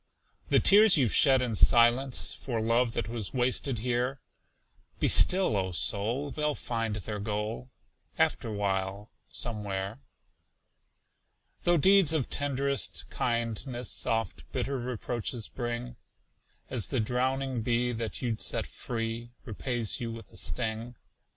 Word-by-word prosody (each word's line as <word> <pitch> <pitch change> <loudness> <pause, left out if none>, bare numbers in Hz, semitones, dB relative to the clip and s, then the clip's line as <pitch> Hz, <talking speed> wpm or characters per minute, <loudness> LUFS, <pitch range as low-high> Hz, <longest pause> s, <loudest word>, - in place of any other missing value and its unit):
The - - +5
tears 205 -2 +7
you've 125 -6 +1
shed 135 -3 +5
in 120 -3 -2
silence 120 +4 +4
For 120 -4 -4
love 115 +1 +1
that - - -2
was 115 0 -4
wasted 125 +1 0
here 125 +3 -2 0.8
Be - - +2
still, 185 - +6
O 95 -2 -1
soul! 115 - -1
They'll 150 0 -1
find 115 -3 -3
their 105 +1 -5
goal, 105 +4 -4 0.5
Afterwhile, 100 -1 -1 0.2
somewhere. 105 -1 -4 1.7
Though 175 0 +4
deeds 190 -1 +5
of 150 -6 -1
tend'rest 140 -1 0
kindness 120 +1 -2
Oft 115 -3 -3
bitter 135 -1 -2
reproaches 120 -1 -3
bring, 120 0 -5 0.7
As 120 -6 +1
the 130 - -1
drowning 130 +2 -1
bee 120 +2 0
that 115 +1 -5
you'd 115 -3 -2
set - - +2
free 115 0 -5 0.2
Repays 120 -1 -2
you 115 -1 -4
with 115 0 -10
a - - -17
sting. 115 +1 -3
120 Hz, 125 wpm, -28 LUFS, 110-130 Hz, 1.7 s, tears